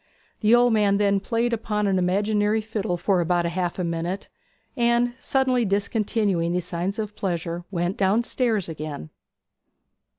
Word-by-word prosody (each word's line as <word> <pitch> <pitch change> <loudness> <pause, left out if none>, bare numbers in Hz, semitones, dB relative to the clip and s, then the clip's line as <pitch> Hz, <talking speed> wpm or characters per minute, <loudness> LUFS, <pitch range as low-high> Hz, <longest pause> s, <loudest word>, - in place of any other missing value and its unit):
The 220 +2 +5
old 240 -1 +4
man 205 -2 +3
then 200 -1 +2
played 235 +3 -1
upon 210 -2 -1
an 190 -2 +2
imaginary 205 +4 +1
fiddle 215 -4 -3
for 180 +1 +1
about 175 0 +1
half 175 0 -2
a 185 - -1
minute; 170 +3 -3 0.5
and, 240 0 +2
suddenly 260 -2 +1
discontinuing 200 -3 0
these 180 -1 -1
signs 180 +4 -3
of 210 -1 -4
pleasure, 175 -2 -3
went 175 0 -2
downstairs 220 +1 +1
again. 155 - -6
200 Hz, 140 wpm, -24 LUFS, 175-220 Hz, 0.5 s, The